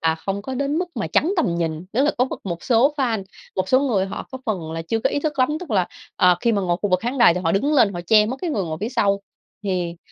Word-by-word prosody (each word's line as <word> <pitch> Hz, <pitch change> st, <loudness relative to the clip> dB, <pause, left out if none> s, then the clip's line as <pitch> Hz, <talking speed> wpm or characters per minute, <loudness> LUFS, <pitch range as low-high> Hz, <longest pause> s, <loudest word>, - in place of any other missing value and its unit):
à, 160 Hz, 0 st, +2 dB
không 195 Hz, +5 st, -4 dB
có 265 Hz, +4 st, -5 dB
đến 280 Hz, +3 st, -1 dB
mức 360 Hz, 0 st, -2 dB
mà -, -, -1 dB
chắn 350 Hz, +5 st, +2 dB
tầm 285 Hz, -, +1 dB
nhìn, 165 Hz, 0 st, -2 dB
tức 255 Hz, -, +2 dB
là 300 Hz, -, +3 dB
có 250 Hz, -, +4 dB
m -, -, -6 dB, 0.2 s
một 170 Hz, -3 st, -4 dB
số 260 Hz, +4 st, +3 dB
fan, 230 Hz, -8 st, 0 dB, 0.3 s
một 185 Hz, 0 st, -1 dB
số 260 Hz, -, +4 dB
người 215 Hz, -9 st, +1 dB
họ -, -, -6 dB
có 260 Hz, -, -5 dB
phần 170 Hz, -7 st, -2 dB
là 165 Hz, 0 st, -4 dB
chưa 225 Hz, +7 st, -1 dB
có -, -, +1 dB
ý 285 Hz, -, -1 dB
thức 300 Hz, -2 st, -2 dB
lắm, 255 Hz, +1 st, +4 dB
tức 350 Hz, -, -8 dB
là, 185 Hz, -4 st, +2 dB, 0.3 s
ờ, 180 Hz, -1 st, +5 dB
khi 235 Hz, -1 st, +2 dB
mà 200 Hz, -2 st, +1 dB
ngồi 175 Hz, -1 st, +1 dB
khu 205 Hz, -, 0 dB
vực 185 Hz, 0 st, +3 dB
khán 245 Hz, +5 st, -3 dB
đài 235 Hz, -8 st, +6 dB
thì 180 Hz, -, -2 dB
họ 165 Hz, -2 st, 0 dB
đứng 280 Hz, +10 st, +1 dB
lên, 235 Hz, -8 st, +4 dB
họ 175 Hz, -, -3 dB
che 215 Hz, +1 st, +5 dB
mất 255 Hz, +4 st, -3 dB
cái 350 Hz, -, -1 dB
người 205 Hz, -10 st, -1 dB
ngồi 160 Hz, -2 st, -4 dB
phía 215 Hz, -, -1 dB
sau. 200 Hz, -5 st, +1 dB, 0.4 s
Thì, 180 Hz, -3 st, -2 dB
210 Hz, 305 wpm, -22 LUFS, 180-260 Hz, 0.4 s, đài